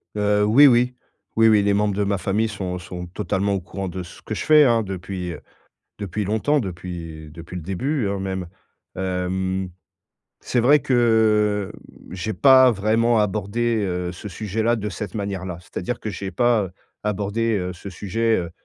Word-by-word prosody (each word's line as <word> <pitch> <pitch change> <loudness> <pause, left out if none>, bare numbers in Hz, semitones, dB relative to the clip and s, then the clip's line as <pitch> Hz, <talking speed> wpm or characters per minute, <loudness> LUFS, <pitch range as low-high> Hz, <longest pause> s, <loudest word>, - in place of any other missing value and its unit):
Heu, 105 0 +2
oui, 130 +8 +7
oui. 125 0 +3 0.4
Oui, 115 0 +5
oui, 105 -1 +5
les 100 0 +2
membres 105 0 +1
de 105 - +1
ma 100 0 0
famille 100 +5 0
sont 95 -4 -4
sont 90 0 -7
totalement 100 +2 -1
au - - -1
courant 95 +2 -6
de 90 +1 -5
ce 85 - -13
que - - -6
je - - -4
fais, 155 -1 +7
hein, 115 -4 +3
depuis 95 -2 -5 0.7
depuis 100 +1 -3
longtemps, 110 +9 +1
depuis 85 - -6
depuis 85 +3 -10
le 90 - -5
début, 110 - -1
hein, 100 0 -2
même. 95 -2 -3 0.5
Hem, 95 0 -2 0.7
c'est 125 - 0
vrai 140 +6 +6
que, 110 -5 +2 0.4
mmh, - - -8
j'ai 95 +4 -3
pas 130 -2 +7
vraiment 115 +2 +2
abordé, 105 +2 0
heu, 90 -1 -2
ce 100 +4 -8
sujet-là, 110 +4 -1
de 105 -1 -3
cette 100 0 -6
manière-là. 95 -3 -4
C'est-à-dire 90 +6 -5
que - - -5
j'ai 100 -1 -5
pas 115 -6 +2 0.3
abordé, 105 +2 0
heu, 90 0 -3
ce 90 +3 -9
sujet, 110 +5 0
heu 85 -2 -4
100 Hz, 175 wpm, -22 LUFS, 95-110 Hz, 0.7 s, oui